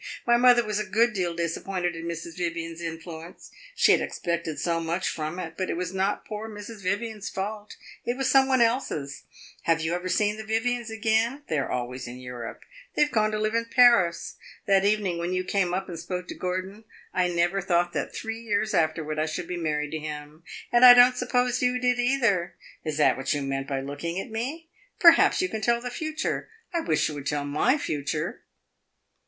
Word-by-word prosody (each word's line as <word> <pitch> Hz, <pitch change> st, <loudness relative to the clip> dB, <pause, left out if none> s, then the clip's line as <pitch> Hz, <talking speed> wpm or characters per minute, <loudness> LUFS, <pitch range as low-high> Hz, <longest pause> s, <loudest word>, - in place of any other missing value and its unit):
My 240 Hz, -, +5 dB
mother 240 Hz, -1 st, +5 dB
was 210 Hz, -1 st, -1 dB
a -, -, 0 dB
good 225 Hz, +4 st, +2 dB
deal 180 Hz, -4 st, -1 dB
disappointed 175 Hz, +1 st, -2 dB
in 165 Hz, 0 st, -6 dB
Mrs. 170 Hz, 0 st, -6 dB
Vivian's 170 Hz, -1 st, -4 dB
influence; 165 Hz, +1 st, -8 dB, 0.2 s
she -, -, +5 dB
had -, -, +4 dB
expected 170 Hz, -2 st, -3 dB
so 170 Hz, -1 st, 0 dB
much 170 Hz, +2 st, -1 dB
from 155 Hz, +2 st, -3 dB
it. 165 Hz, -3 st, -5 dB
But 185 Hz, -, -2 dB
it -, -, -2 dB
was 180 Hz, 0 st, -3 dB
not 190 Hz, +2 st, -1 dB
poor 215 Hz, +1 st, -6 dB
Mrs. 210 Hz, 0 st, -9 dB
Vivian's 210 Hz, +2 st, -2 dB
fault, 205 Hz, +2 st, -5 dB, 0.3 s
it 240 Hz, +1 st, -2 dB
was 270 Hz, -1 st, 0 dB
some 270 Hz, -1 st, +5 dB
one's 260 Hz, -2 st, +4 dB
else. 190 Hz, -, -2 dB, 0.4 s
Have 165 Hz, -1 st, +3 dB
you 160 Hz, +1 st, -1 dB
ever 180 Hz, +1 st, -3 dB
seen 210 Hz, +3 st, +1 dB
the 220 Hz, -, -6 dB
Vivians 230 Hz, +2 st, -1 dB
again? 225 Hz, +5 st, 0 dB
They 155 Hz, -, +1 dB
are 135 Hz, -, -2 dB
always 125 Hz, +1 st, -4 dB
in 120 Hz, +1 st, -8 dB
Europe; 125 Hz, -2 st, -8 dB, 0.3 s
they -, -, +5 dB
have 295 Hz, -, -1 dB
gone 215 Hz, -1 st, +2 dB
to 215 Hz, -, -2 dB
live 215 Hz, +1 st, 0 dB
in 230 Hz, 0 st, +1 dB
Paris. 230 Hz, -9 st, +4 dB, 0.3 s
That 195 Hz, -2 st, +3 dB
evening 200 Hz, -4 st, +1 dB
when 175 Hz, +2 st, -2 dB
you 185 Hz, -, 0 dB
came 185 Hz, -1 st, 0 dB
up 190 Hz, +2 st, -2 dB
and 170 Hz, -3 st, -6 dB
spoke 180 Hz, +1 st, -5 dB
to -, -, -4 dB
Gordon, 185 Hz, +4 st, -4 dB, 0.3 s
I 185 Hz, -1 st, +2 dB
never 175 Hz, +2 st, +1 dB
thought 175 Hz, -1 st, +1 dB
that -, -, -2 dB
three 225 Hz, 0 st, -5 dB
years 215 Hz, -1 st, -1 dB
afterward 155 Hz, -1 st, 0 dB
I 155 Hz, -, +1 dB
should 160 Hz, +2 st, -4 dB
be 180 Hz, -, -3 dB
married 150 Hz, -3 st, -2 dB
to 160 Hz, -, -3 dB
him, 150 Hz, 0 st, -7 dB, 0.3 s
and 240 Hz, +1 st, +4 dB
I 245 Hz, -1 st, +12 dB
don't 245 Hz, +1 st, +7 dB
suppose 250 Hz, 0 st, 0 dB
you 250 Hz, 0 st, +2 dB
did 250 Hz, 0 st, +1 dB
either. 235 Hz, -9 st, +1 dB, 0.3 s
Is 155 Hz, -2 st, -3 dB
that 150 Hz, -, +4 dB
what 135 Hz, +3 st, -1 dB
you 145 Hz, -, -2 dB
meant 135 Hz, 0 st, -3 dB
by 135 Hz, -2 st, -2 dB
looking 145 Hz, +6 st, -4 dB
at 195 Hz, -, -7 dB
me? 270 Hz, +9 st, -4 dB, 0.3 s
Perhaps 335 Hz, +2 st, +6 dB
you -, -, +1 dB
can 220 Hz, -, -4 dB
tell 235 Hz, +3 st, +2 dB
the 245 Hz, +1 st, -5 dB
future. 315 Hz, -, -3 dB, 0.2 s
I 340 Hz, -, +1 dB
wish 155 Hz, -, +1 dB
you 155 Hz, -, -4 dB
would 145 Hz, -1 st, -6 dB
tell 145 Hz, -1 st, -1 dB
my 150 Hz, -, +2 dB
future!" 145 Hz, -, -3 dB
185 Hz, 210 wpm, -26 LUFS, 165-230 Hz, 0.4 s, I